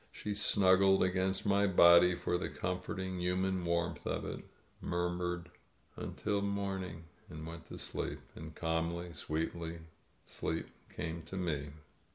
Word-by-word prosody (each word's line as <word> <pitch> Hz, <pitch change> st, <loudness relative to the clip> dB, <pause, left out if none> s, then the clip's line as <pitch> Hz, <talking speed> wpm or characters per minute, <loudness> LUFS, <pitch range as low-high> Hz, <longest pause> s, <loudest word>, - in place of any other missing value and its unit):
She 105 Hz, -, -4 dB
snuggled 95 Hz, -1 st, +5 dB
against 95 Hz, +1 st, +1 dB
my 100 Hz, 0 st, +4 dB
body 85 Hz, -1 st, +7 dB
for 90 Hz, -, -1 dB
the -, -, -2 dB
comfort 90 Hz, +1 st, -3 dB
ing 95 Hz, -1 st, -3 dB
human 90 Hz, +1 st, +1 dB
warmth 85 Hz, -1 st, -1 dB
of -, -, -1 dB
it, -, -, -5 dB, 0.4 s
murmured, 85 Hz, 0 st, -2 dB, 0.4 s
"Until 100 Hz, -1 st, -2 dB
morning,'* 95 Hz, -4 st, -2 dB, 0.3 s
and 80 Hz, 0 st, -7 dB
went 85 Hz, 0 st, -8 dB
to -, -, -8 dB
sleep. -, -, -3 dB, 0.2 s
And 80 Hz, 0 st, -9 dB
calmly, 85 Hz, +1 st, -1 dB
sweetly, 80 Hz, +2 st, -3 dB, 0.5 s
sleep 80 Hz, +1 st, -3 dB, 0.2 s
came 85 Hz, 0 st, -4 dB
to 95 Hz, +4 st, -6 dB
me. 75 Hz, -5 st, -2 dB
90 Hz, 135 wpm, -34 LUFS, 85-95 Hz, 0.5 s, body